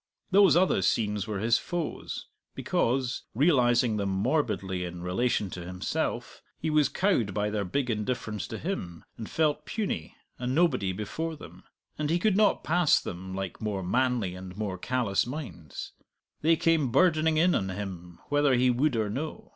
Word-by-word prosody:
Those 190 Hz, -5 st, +6 dB
other 185 Hz, +2 st, +3 dB
scenes 105 Hz, -2 st, 0 dB
were 105 Hz, -2 st, -2 dB
his 115 Hz, +4 st, +2 dB
foes, 175 Hz, -3 st, -4 dB, 0.3 s
because, 125 Hz, +1 st, 0 dB
realizing 120 Hz, -5 st, +3 dB
them 100 Hz, -1 st, -1 dB
morbidly 95 Hz, -, 0 dB
in 90 Hz, 0 st, -6 dB
relation 100 Hz, +1 st, 0 dB
to 90 Hz, -, -6 dB
himself, 90 Hz, +1 st, -3 dB, 0.2 s
he 160 Hz, -, -1 dB
was 150 Hz, -2 st, +4 dB
cowed 130 Hz, -, +1 dB
by 105 Hz, 0 st, 0 dB
their 105 Hz, -1 st, -1 dB
big 125 Hz, +7 st, -1 dB
indifference 105 Hz, -2 st, -3 dB
to 110 Hz, -, -5 dB
him, 90 Hz, -, -5 dB
and 110 Hz, -, -7 dB
felt 155 Hz, -2 st, +1 dB
puny, 195 Hz, -, -3 dB, 0.2 s
a 125 Hz, -, -3 dB
nobody 130 Hz, -, +2 dB
before 155 Hz, -, -4 dB
them. -, -, -13 dB, 0.3 s
And 150 Hz, -1 st, -1 dB
he 170 Hz, -, +3 dB
could 200 Hz, +2 st, +2 dB
not 210 Hz, 0 st, +3 dB
pass 175 Hz, -1 st, +4 dB
them 95 Hz, +1 st, -6 dB
like 95 Hz, -2 st, -5 dB
more 105 Hz, -3 st, -2 dB
manly 120 Hz, -1 st, +1 dB
and 90 Hz, 0 st, -9 dB
more 100 Hz, -4 st, -3 dB
callous 120 Hz, -3 st, 0 dB
minds; 95 Hz, -, -7 dB, 0.5 s
they 165 Hz, +2 st, +4 dB
came 160 Hz, -5 st, +2 dB
burdening 160 Hz, 0 st, +3 dB
in 175 Hz, +3 st, +4 dB
on 95 Hz, -, 0 dB
him 90 Hz, -3 st, -6 dB
whether 145 Hz, -2 st, +3 dB
he 125 Hz, +1 st, +4 dB
would 130 Hz, +2 st, +1 dB
or 110 Hz, -2 st, +1 dB
no. 155 Hz, -, -5 dB
120 Hz, 165 wpm, -28 LUFS, 95-155 Hz, 0.5 s, Those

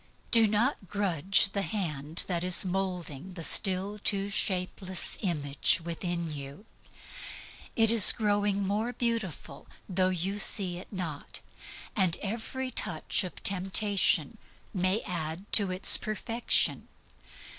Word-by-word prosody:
Do 225 Hz, -2 st, +6 dB
not 215 Hz, 0 st, -1 dB
grudge 195 Hz, 0 st, +1 dB
the 200 Hz, -, -2 dB
hand 160 Hz, -5 st, -3 dB
that 175 Hz, -2 st, -3 dB
is 180 Hz, +1 st, +6 dB
moulding 180 Hz, -3 st, -5 dB
the 170 Hz, -2 st, -8 dB
still 195 Hz, +4 st, +1 dB
too 200 Hz, 0 st, 0 dB
shapeless 185 Hz, -1 st, -1 dB
image 145 Hz, -5 st, +1 dB
within 170 Hz, -1 st, -5 dB
you. 140 Hz, +7 st, -10 dB, 1.1 s
It 225 Hz, -1 st, +3 dB
is 230 Hz, -4 st, +9 dB
growing 205 Hz, -2 st, -1 dB
more 215 Hz, +5 st, -3 dB
beautiful, 225 Hz, -, -4 dB, 0.2 s
though 185 Hz, -1 st, 0 dB
you 185 Hz, +3 st, -3 dB
see 185 Hz, -5 st, +1 dB
it -, -, -14 dB
not; 170 Hz, -7 st, -7 dB, 0.6 s
and 185 Hz, -5 st, +1 dB
every 235 Hz, +5 st, -5 dB
touch 160 Hz, -4 st, -3 dB
of 180 Hz, -, -10 dB
temptation 195 Hz, 0 st, +2 dB, 0.3 s
may 185 Hz, +2 st, 0 dB
add 165 Hz, +1 st, -5 dB
to 200 Hz, -3 st, +4 dB
its 185 Hz, +1 st, +6 dB
perfection. 225 Hz, +3 st, -1 dB
190 Hz, 120 wpm, -28 LUFS, 175-205 Hz, 1.1 s, is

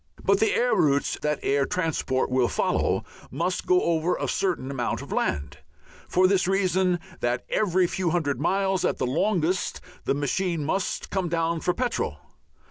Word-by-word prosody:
But 395 Hz, -, +3 dB
the 440 Hz, -1 st, +3 dB
air -, -, +2 dB
routes 140 Hz, -1 st, +2 dB
that 150 Hz, -1 st, 0 dB
air 140 Hz, 0 st, +2 dB
transport 155 Hz, -7 st, -1 dB
will 130 Hz, -1 st, +3 dB
follow -, -, 0 dB, 0.3 s
must 170 Hz, +7 st, -2 dB
go 180 Hz, 0 st, +4 dB
over 170 Hz, +1 st, +1 dB
a -, -, -3 dB
certain 175 Hz, -8 st, -1 dB
amount 125 Hz, -3 st, -2 dB
of -, -, -11 dB
land, 75 Hz, 0 st, -2 dB, 0.5 s
for 185 Hz, +1 st, +3 dB
this 190 Hz, -2 st, +2 dB
reason 185 Hz, -2 st, +2 dB, 0.2 s
that 120 Hz, 0 st, -1 dB
every 185 Hz, -3 st, +2 dB
few 175 Hz, 0 st, -1 dB
hundred 145 Hz, -6 st, 0 dB
miles 190 Hz, +2 st, +1 dB
at -, -, +1 dB
the -, -, -1 dB
longest 175 Hz, +5 st, 0 dB, 0.3 s
the -, -, +1 dB
machine 155 Hz, +3 st, -1 dB
must 190 Hz, +5 st, -2 dB
come 190 Hz, -3 st, -1 dB
down 165 Hz, 0 st, 0 dB
for 180 Hz, -, 0 dB
petrol. 245 Hz, -1 st, -1 dB
175 Hz, 165 wpm, -25 LUFS, 145-190 Hz, 0.5 s, go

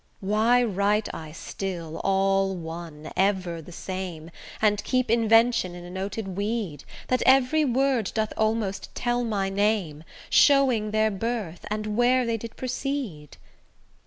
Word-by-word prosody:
Why 220 Hz, +4 st, +3 dB
write 205 Hz, 0 st, 0 dB
I 155 Hz, -1 st, -7 dB
still 170 Hz, -1 st, -5 dB
all 195 Hz, 0 st, +2 dB
one, 165 Hz, -2 st, -8 dB
ever 185 Hz, -4 st, 0 dB
the 170 Hz, -, -12 dB
same, 175 Hz, -3 st, -6 dB, 0.3 s
And 210 Hz, -1 st, +2 dB
keep 255 Hz, -3 st, 0 dB
invention 225 Hz, -4 st, +3 dB
in 175 Hz, -, -9 dB
a 175 Hz, -, -9 dB
noted 195 Hz, +2 st, -4 dB
weed, 200 Hz, -, -3 dB, 0.2 s
That 255 Hz, -, +2 dB
every 270 Hz, +4 st, +4 dB
word 260 Hz, -4 st, +1 dB
doth 220 Hz, -1 st, 0 dB
almost 215 Hz, -3 st, -1 dB
tell 240 Hz, 0 st, 0 dB
my 200 Hz, -4 st, -1 dB
name, 195 Hz, -7 st, 0 dB, 0.3 s
Showing 260 Hz, -7 st, +4 dB
their 215 Hz, 0 st, +2 dB
birth, 200 Hz, -4 st, -4 dB
and 210 Hz, 0 st, -3 dB
where 250 Hz, +1 st, +3 dB
they 230 Hz, -1 st, 0 dB
did 230 Hz, +1 st, -9 dB
proceed? 255 Hz, -, -4 dB
210 Hz, 135 wpm, -26 LUFS, 185-235 Hz, 0.3 s, every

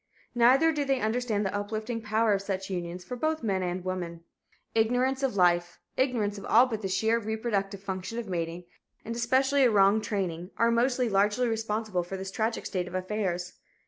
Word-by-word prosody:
Neither 255 Hz, +7 st, +5 dB
do 300 Hz, -2 st, -1 dB
they 270 Hz, -2 st, +1 dB
understand 220 Hz, -2 st, 0 dB
the 190 Hz, -, -2 dB
uplifting 215 Hz, +3 st, -3 dB
power 215 Hz, 0 st, +2 dB
of 195 Hz, -, 0 dB
such 195 Hz, -1 st, -4 dB
unions 175 Hz, 0 st, -4 dB
for 250 Hz, -, -6 dB
both 310 Hz, +4 st, -1 dB
men 195 Hz, -4 st, 0 dB
and 180 Hz, 0 st, -3 dB
women. 175 Hz, -2 st, -4 dB, 0.5 s
Ignorance 250 Hz, +4 st, +2 dB
of 270 Hz, -6 st, 0 dB
life, 175 Hz, -2 st, +2 dB, 0.2 s
ignorance 220 Hz, -6 st, 0 dB
of -, -, -9 dB
all 240 Hz, +3 st, +6 dB
but 225 Hz, -4 st, -4 dB
the 195 Hz, -, -2 dB
sheer 220 Hz, +4 st, +1 dB
reproductive 210 Hz, -3 st, -2 dB
function 190 Hz, +3 st, -4 dB
of 235 Hz, -2 st, -4 dB
mating, 170 Hz, -1 st, -3 dB, 0.4 s
and 230 Hz, -, -4 dB
especially 265 Hz, +4 st, +2 dB
a 250 Hz, -, +6 dB
wrong 205 Hz, 0 st, +4 dB
training, 180 Hz, -5 st, -3 dB
are 230 Hz, 0 st, +3 dB
most 245 Hz, +2 st, +2 dB
largely 210 Hz, 0 st, +2 dB
responsible 220 Hz, -4 st, -1 dB
for 175 Hz, +2 st, -6 dB
this 190 Hz, 0 st, -6 dB
tragic 225 Hz, +1 st, -2 dB
state 180 Hz, -3 st, -2 dB
of 180 Hz, -, -7 dB
affairs. 185 Hz, -2 st, -2 dB
210 Hz, 185 wpm, -28 LUFS, 185-235 Hz, 0.5 s, all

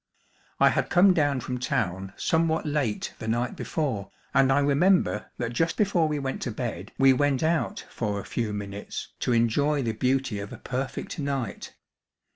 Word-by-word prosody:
I -, -, +7 dB
had -, -, 0 dB
come 185 Hz, +1 st, +6 dB
down 145 Hz, -6 st, +1 dB
from 125 Hz, +1 st, -4 dB
town 95 Hz, -5 st, -2 dB
somewhat 160 Hz, 0 st, +1 dB
late 145 Hz, -8 st, -1 dB
the 110 Hz, -, -6 dB
night 120 Hz, +2 st, 0 dB
before, 130 Hz, -12 st, -2 dB, 0.2 s
and 135 Hz, 0 st, +4 dB
I 135 Hz, -, +4 dB
remember 145 Hz, -, +3 dB
that 120 Hz, -1 st, -3 dB
just 165 Hz, +7 st, 0 dB
before 190 Hz, -6 st, +2 dB
we 150 Hz, -1 st, -1 dB
went 135 Hz, -2 st, -3 dB
to -, -, -2 dB
bed 105 Hz, -5 st, -5 dB
we 135 Hz, 0 st, +6 dB
went 145 Hz, +1 st, +1 dB
out 160 Hz, -6 st, 0 dB
for 105 Hz, -3 st, -3 dB
a -, -, -8 dB
few 115 Hz, -3 st, -2 dB
minutes 100 Hz, 0 st, -5 dB
to -, -, 0 dB
enjoy 135 Hz, +5 st, +2 dB
the 115 Hz, -, 0 dB
beauty 125 Hz, -1 st, 0 dB
of 100 Hz, 0 st, -6 dB
a -, -, -7 dB
perfect 130 Hz, +4 st, -4 dB
night. 135 Hz, -7 st, -3 dB
130 Hz, 175 wpm, -26 LUFS, 110-150 Hz, 0.2 s, I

